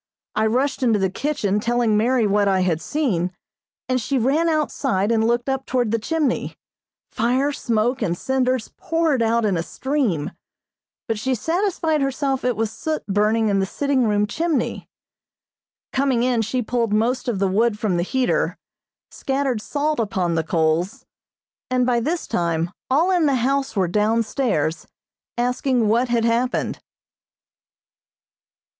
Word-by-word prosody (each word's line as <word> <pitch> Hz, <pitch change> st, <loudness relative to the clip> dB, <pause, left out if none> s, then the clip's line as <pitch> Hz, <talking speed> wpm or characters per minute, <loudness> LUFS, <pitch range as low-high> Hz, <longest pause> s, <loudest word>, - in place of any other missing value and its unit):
I 215 Hz, +1 st, +1 dB
rushed 260 Hz, +5 st, 0 dB
into 230 Hz, -4 st, +3 dB
the 190 Hz, -2 st, 0 dB
kitchen 215 Hz, -6 st, -1 dB
telling 235 Hz, -1 st, +1 dB
Mary 235 Hz, +2 st, +2 dB
what 205 Hz, 0 st, +2 dB
I 190 Hz, -1 st, +2 dB
had 170 Hz, -3 st, 0 dB
seen, 205 Hz, -, -1 dB, 0.6 s
and 255 Hz, 0 st, 0 dB
she 270 Hz, +5 st, -1 dB
ran 285 Hz, +8 st, +2 dB
outside 270 Hz, -9 st, 0 dB
and 225 Hz, -1 st, +2 dB
looked 240 Hz, +1 st, 0 dB
up 270 Hz, 0 st, -2 dB
toward 245 Hz, -4 st, 0 dB
the 230 Hz, -, +1 dB
chimney. 300 Hz, +2 st, -1 dB, 0.6 s
Fire, 255 Hz, +5 st, +1 dB
smoke 240 Hz, -2 st, 0 dB
and 175 Hz, -1 st, 0 dB
cinders 255 Hz, -1 st, -1 dB
poured 325 Hz, -6 st, 0 dB
out 230 Hz, 0 st, +2 dB
in 195 Hz, -4 st, +1 dB
a -, -, 0 dB
stream, 240 Hz, -, -1 dB, 0.8 s
but 225 Hz, -2 st, -1 dB
she 260 Hz, +4 st, 0 dB
satisfied 325 Hz, -, 0 dB
herself 275 Hz, 0 st, -1 dB
it 250 Hz, -1 st, +1 dB
was 220 Hz, 0 st, -1 dB
soot 310 Hz, +6 st, -3 dB
burning 210 Hz, +2 st, +2 dB
in 200 Hz, -1 st, +2 dB
the 195 Hz, -, 0 dB
sitting 280 Hz, +2 st, 0 dB
room 210 Hz, -1 st, +2 dB
chimney. 310 Hz, +2 st, -2 dB, 1.0 s
Coming 265 Hz, -3 st, +1 dB
in, 245 Hz, -2 st, +2 dB
she 245 Hz, +3 st, -1 dB
pulled 230 Hz, -1 st, -1 dB
most 240 Hz, +5 st, 0 dB
of 235 Hz, -5 st, 0 dB
the 195 Hz, 0 st, +1 dB
wood 210 Hz, +3 st, +1 dB
from 205 Hz, -4 st, 0 dB
the -, -, +1 dB
heater, 250 Hz, +7 st, 0 dB, 0.5 s
scattered 270 Hz, -4 st, -1 dB
salt 295 Hz, +3 st, -1 dB
upon 190 Hz, -6 st, 0 dB
the 165 Hz, -1 st, 0 dB
coals, 165 Hz, +3 st, 0 dB, 0.6 s
and 255 Hz, -1 st, +2 dB
by 245 Hz, -1 st, +2 dB
this 320 Hz, +8 st, -2 dB
time 170 Hz, 0 st, -1 dB, 0.2 s
all 320 Hz, +8 st, +3 dB
in 350 Hz, -4 st, +3 dB
the 275 Hz, -, +2 dB
house 270 Hz, +2 st, 0 dB
were 190 Hz, -3 st, +2 dB
down 215 Hz, +5 st, +2 dB
stairs, 205 Hz, -, -1 dB, 0.5 s
asking 250 Hz, -1 st, +1 dB
what 235 Hz, +4 st, +2 dB
had 235 Hz, -1 st, +1 dB
happened. 235 Hz, +2 st, 0 dB
235 Hz, 155 wpm, -22 LUFS, 210-270 Hz, 1.0 s, into